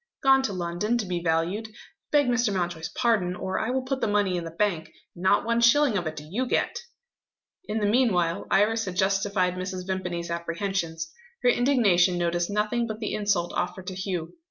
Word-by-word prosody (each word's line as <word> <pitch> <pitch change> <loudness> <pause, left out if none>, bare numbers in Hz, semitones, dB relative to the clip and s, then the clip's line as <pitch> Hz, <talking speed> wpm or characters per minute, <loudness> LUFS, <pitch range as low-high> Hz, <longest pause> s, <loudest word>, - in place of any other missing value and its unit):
"Gone 270 0 +6
to 225 -7 -2
London 180 +6 -1
to 225 - -2
be 180 -2 -2
valued. 170 +6 0 0.4
Beg 290 -1 +4
Mr. 240 -3 +1
Mountjoy's 175 -4 -2
pardon, 210 -7 +1
or 190 0 -3
I 220 - -1
will 260 +1 0
put 265 0 -3
the - - +1
money 205 -3 +1
in 175 - -2
the - - -5
bank 165 -2 -1 0.2
and 175 - -12
not 190 +3 +3
one 235 0 +1
shilling 245 +1 +5
of 175 -5 -1
it 155 - -4
do 150 0 -9
you 240 +10 -2
get." 485 - 0 0.9
In 220 - -3
the 210 - 0
meanwhile, 205 -7 +2
Iris 220 +3 +2
had 185 -2 -5
justified 195 -1 +1
Mrs. 185 0 -5
Vimpany's 180 -3 -3
apprehensions. 170 - -3 0.3
Her 245 - +5
indignation 210 -9 +3
noticed 175 0 0
nothing 215 +3 0
but 220 -1 -5
the 215 - -3
insult 200 -5 0
offered 180 +1 -3
to 185 - -5
Hugh. 185 -3 -4
195 Hz, 195 wpm, -26 LUFS, 175-225 Hz, 0.9 s, Gone